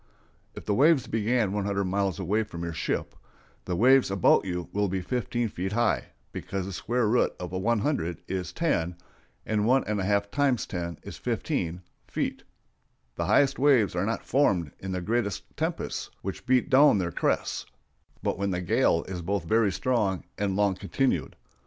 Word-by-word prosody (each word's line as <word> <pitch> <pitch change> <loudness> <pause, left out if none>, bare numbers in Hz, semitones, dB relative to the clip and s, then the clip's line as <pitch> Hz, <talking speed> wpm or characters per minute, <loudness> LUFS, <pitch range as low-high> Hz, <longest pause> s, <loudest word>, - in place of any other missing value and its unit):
If - - -9
the 105 - +1
waves 145 +3 +4
began 110 -1 +1
100 100 -1 -1
miles 95 0 0
away 100 +3 0
from 85 -6 -6
your 85 -1 -3
ship, - - -2 0.5
the 90 - -2
waves 130 +6 +5
about 95 0 +4
you 90 -3 -3
will 105 0 +1
be 95 0 -1
15 120 +3 -1
feet 95 0 -4
high, 115 -1 +1 0.3
because 95 -2 -4
the 100 - -6
square 120 +5 0
root 120 +3 +2
of 90 -1 -5
100 100 - -1
is 90 -1 -3
10, 90 - 0 0.5
and 105 -1 0
one 130 +2 +4
and 105 -1 -2
a - - -1
half 100 +1 +1
times 140 -3 +1
10 85 -2 -4
is - - -8
15 85 +2 -2 0.2
(feet). - - -2 0.7
The 85 +3 -3
highest 135 +7 +3
waves 130 -9 +4
are 90 +3 0
not 115 - -2
formed 95 - +2
in 95 - -5
the 90 -1 -2
greatest 110 +1 -1
tempests, - - -3
which 95 +5 -6
beat 125 -1 +2
down 140 -2 +6
their 90 -3 -1
crests, - - -1 0.6
but - - -1
when 100 0 0
the 90 -2 -1
gale 85 -1 +2
is 90 -2 -6
both 95 +1 -1
very 110 +3 +2
strong 105 -3 0
and 100 -2 -1
long 100 -1 +2
continued. 130 +8 -1
100 Hz, 175 wpm, -27 LUFS, 90-120 Hz, 0.7 s, down